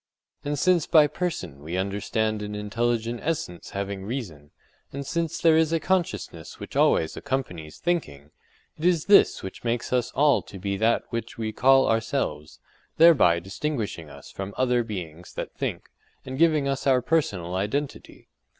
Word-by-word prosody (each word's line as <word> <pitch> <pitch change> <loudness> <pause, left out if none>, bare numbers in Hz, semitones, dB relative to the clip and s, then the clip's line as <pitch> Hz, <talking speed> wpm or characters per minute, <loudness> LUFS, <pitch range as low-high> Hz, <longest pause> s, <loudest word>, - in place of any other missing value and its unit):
And 145 0 -2
since 175 +2 +2
by 155 -3 +6
person 150 - -4
we 80 +5 -4
understand 105 +3 -1
an 105 0 -5
intelligent 115 +2 -1
essence 140 - -3
having 100 -1 -4
reason, 95 - -6 0.4
and 140 0 -6
since 165 +3 -2
there 165 -1 +4
is 160 0 +3
a 165 - +2
consciousness 170 - -2
which - - -9
always 80 - +3
accompanies 90 - -4
thinking, 75 - -3 0.5
it - - -8
is 175 -3 +3
this 200 - +5
which 95 - -8
makes 120 +1 -2
us 125 -1 +1
all 145 -1 +4
to 100 - -11
be 100 +1 -2
that 110 +4 +2
which 115 -1 -5
we 110 -1 -2
call 135 +3 +5
_ourselves_—thereby 115 - +2
distinguishing 100 - -4
us 70 -1 -12
from 95 +1 -6
other 125 -2 +2
beings 90 -6 -7
that - - -5
think, - - -4 0.3
and 130 +1 -6
giving 155 -4 +3
us 135 0 -2
our 130 -2 +4
personal 100 - 0
identity. 105 +10 -4
115 Hz, 155 wpm, -25 LUFS, 95-145 Hz, 0.5 s, by